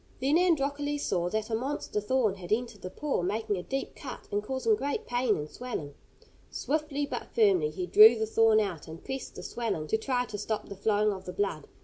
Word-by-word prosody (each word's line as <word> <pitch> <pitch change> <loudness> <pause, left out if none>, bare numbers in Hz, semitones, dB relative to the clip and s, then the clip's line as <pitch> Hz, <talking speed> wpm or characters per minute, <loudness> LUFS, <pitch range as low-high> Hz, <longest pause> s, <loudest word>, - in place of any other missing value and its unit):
Then 275 +4 +2
Androcles 290 -4 +1
saw 175 -1 0
that 215 +3 -2
a - - +2
monster 255 -3 -2
thorn 220 -1 +2
had 185 -3 -10
entered 220 -2 -1
the 185 - -5
paw, 285 +3 -2
making 210 +3 -1
a - - -3
deep 270 +8 -4
cut, 260 -3 -8
and 205 - 0
causing 235 -1 +1
great 280 +6 -3
pain 245 -2 +1
and 150 0 -4
swelling. 160 - -6 0.6
Swiftly 295 -1 -1
but - - -5
firmly 195 -9 +4
he 180 +4 -4
drew 220 +5 +8
the 220 - 0
thorn 220 0 +4
out, 185 -8 -3
and 160 +1 -10
pressed 265 0 -5
the - - -8
swelling 225 -10 -2
to 220 - +1
try 250 +1 0
to 210 -3 -6
stop 215 +1 -3
the 200 - -6
flowing 210 +1 +2
of 190 -1 -9
the 180 - -6
blood. 180 -8 -2
220 Hz, 215 wpm, -29 LUFS, 195-260 Hz, 0.6 s, drew